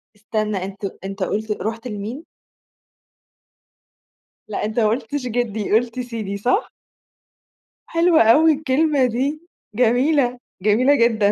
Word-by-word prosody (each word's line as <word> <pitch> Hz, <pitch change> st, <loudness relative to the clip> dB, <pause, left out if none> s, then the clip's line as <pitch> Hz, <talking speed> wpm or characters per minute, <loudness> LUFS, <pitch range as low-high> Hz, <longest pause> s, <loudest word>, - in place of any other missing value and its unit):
استنى، 215 Hz, -1 st, -2 dB
أنت 195 Hz, +1 st, -7 dB, 0.2 s
أنت 195 Hz, 0 st, -4 dB
قُلت 215 Hz, +3 st, -2 dB
رُحت 225 Hz, +3 st, -4 dB
لمين؟ 220 Hz, +7 st, -6 dB, 2.2 s
لأ، 215 Hz, -, -3 dB
أنت 215 Hz, +2 st, -2 dB
ما 220 Hz, -, +3 dB
قُلتش 250 Hz, +4 st, -2 dB
جدّي، 220 Hz, -4 st, -2 dB
قُلت 240 Hz, +2 st, +1 dB
سيدي 225 Hz, -5 st, -4 dB
صح؟ 250 Hz, -, 0 dB, 1.2 s
حلوة 335 Hz, 0 st, +4 dB
أوي 305 Hz, +8 st, +6 dB
الكلمة 290 Hz, -1 st, +1 dB
دي، 270 Hz, +6 st, -1 dB, 0.3 s
جميلة، 250 Hz, +2 st, +2 dB, 0.2 s
جميلة 240 Hz, +8 st, +4 dB
جدًا. 225 Hz, -4 st, +3 dB
235 Hz, 110 wpm, -21 LUFS, 215-270 Hz, 2.2 s, أوي